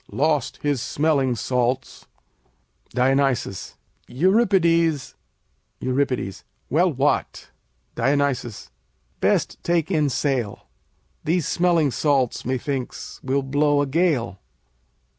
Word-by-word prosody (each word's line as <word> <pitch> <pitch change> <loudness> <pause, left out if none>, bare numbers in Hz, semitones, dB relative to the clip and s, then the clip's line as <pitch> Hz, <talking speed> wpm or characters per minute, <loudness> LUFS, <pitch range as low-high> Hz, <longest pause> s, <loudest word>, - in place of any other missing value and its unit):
lost 150 -2 0
his 145 -4 0
smelling 140 -4 +1
salts. 125 +2 -2 0.8
Dion. 130 +3 +2 0.9
Euripides 170 - +2 0.7
Eur. 130 +2 +1 0.7
Well, 175 +5 +3
what? 140 +1 -1 0.4
Dion. 140 0 +2 0.9
Best - - +1
take 170 0 0
in 155 -4 +2
sail. 130 -6 -2 0.6
These 165 0 0
smelling 170 -5 +2
salts, 135 -3 +1
methinks, 130 +1 -4
will 135 +1 0
blow 145 +1 +2
a - - 0
gale. 140 - 0
145 Hz, 85 wpm, -23 LUFS, 130-160 Hz, 0.9 s, Well